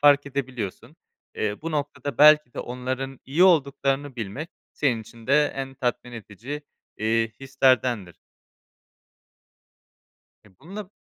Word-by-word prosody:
fark 145 -1 +6
edebiliyorsun. 130 -7 -5 0.4
Eee, 105 -1 -1
bu 165 - -3
noktada 145 -1 -3
belki 150 -3 +7
de - - -7
onların 130 +2 -4
iyi 150 +7 +2
olduklarını 140 -5 +2
bilmek 115 +9 -5 0.2
senin 125 -6 +1
için 115 +1 -14
de 145 +2 +5
en 135 0 -5
tatmin 125 -1 -2
edici, 115 +7 -7 0.4
iii, 115 +1 +1
hislerdendir. 130 - +1 2.3
E, 95 -2 -23
bununla 195 +3 -8
135 Hz, 115 wpm, -25 LUFS, 115-145 Hz, 2.3 s, belki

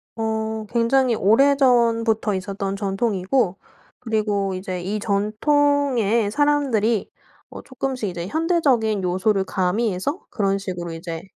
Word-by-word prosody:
어 220 -1 -2
굉장히 240 +1 +2
오래전부터 230 -2 +3
있었던 195 +1 -4
전통이고 195 0 0 0.4
그리고 210 -4 -1
이제 185 -1 -5
이 205 +4 -3
전통에 230 +1 +1
사람들이 245 -5 +1 0.4
어 - - -9
쪼끔씩 260 -5 -4
이제 175 0 -5
현대적인 270 - +1
요소를 190 +2 +1
가미해서 205 - -1
그런 195 -2 0
식으로 180 -3 -5
이제 165 0 -6
220 Hz, 280 characters per minute, -22 LUFS, 195-250 Hz, 0.4 s, 오래전부터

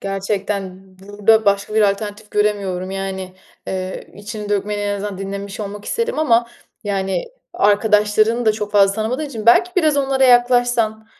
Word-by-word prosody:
gerçekten 195 -1 -3 0.2
burada 205 +3 +2
başka 200 +1 +1
bir 220 - +4
alternatif 210 +1 -7
göremiyorum 200 -3 -1
yani, 190 -1 -5 0.3
eee, 185 0 -5
içini 210 0 -7
dökmeni 205 0 -1
en 205 0 -1
azından 200 -1 -5
dinlemiş 200 +1 -6
olmak 205 0 -6
isterim 465 -2 -2
ama 235 -6 +3 0.4
yani 195 - -1 0.3
arkadaşlarını 210 +2 +2
da 215 - +5
çok 210 -1 -5
fazla 200 -1 +4
tanımadığım 235 +8 -2
için 230 -6 -7
belki 360 +10 +5
biraz 310 -5 +3
onlara 270 -1 +2
yaklaşsan 245 -3 +3
210 Hz, 145 wpm, -19 LUFS, 200-230 Hz, 0.4 s, da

